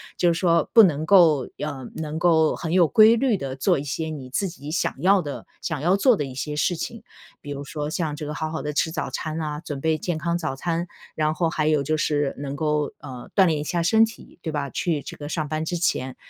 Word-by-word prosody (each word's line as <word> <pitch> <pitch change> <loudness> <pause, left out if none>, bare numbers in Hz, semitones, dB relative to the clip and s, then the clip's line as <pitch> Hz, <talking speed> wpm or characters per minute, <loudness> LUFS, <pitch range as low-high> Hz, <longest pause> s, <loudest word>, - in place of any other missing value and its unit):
就 175 -1 +3
是 165 - -2
说 170 -2 +2
不 230 - +9
能 155 -5 +2
够 160 -8 +5
要 150 - -3
呃 130 -3 -8
能 155 -1 -4
够 160 -3 +3
很 165 -1 -4
有 175 -3 +5
规 220 +4 +6
律 250 -2 +2
地 135 -7 -5
做 135 - +2
一 140 - -4
些 155 +3 -3
你 140 -5 -7
自 195 +10 -1
己 155 -4 -8
想 170 - -1
要 190 +2 +4
的 145 -3 -6 0.2
想 155 -5 -3
要 180 +5 +3
做 245 +3 +4
的 150 - -2
一 135 -2 -7
些 150 +3 -4
事 150 +4 0
情。 230 +5 -6 0.4
比 145 - -8
如 140 0 -5
说 150 +1 -4
像 155 -2 -2
这 150 - -6
个 150 - -4
好 155 +1 -3
好 160 - -4
地 150 - -3
吃 160 +2 0
早 - - -3
餐 155 0 -4
啊， 150 -1 -3
准 145 -4 -6
备 160 -1 +1
健 170 +1 -3
康 170 +2 -1
早 160 -5 -3
餐， 170 +4 -2 0.3
然 155 0 +1
后 165 +1 0
还 155 -2 -1
有 155 -2 +2
就 155 +3 0
是 145 -2 0
能 140 0 -5
够， 150 -1 -1
呃 130 -4 -9
锻 195 - +6
炼 160 -4 +1
一 - - -3
下 170 +1 -1
身 220 +6 +5
体， 225 -5 -13
对 160 -2 -4
吧？ 140 -2 -2
去 160 -1 -1
这 - - -9
个 145 - -7
上 155 0 -2
班 155 +1 -2
之 175 - -2
前 130 -6 -1
155 Hz, 275 characters per minute, -24 LUFS, 145-175 Hz, 0.4 s, 不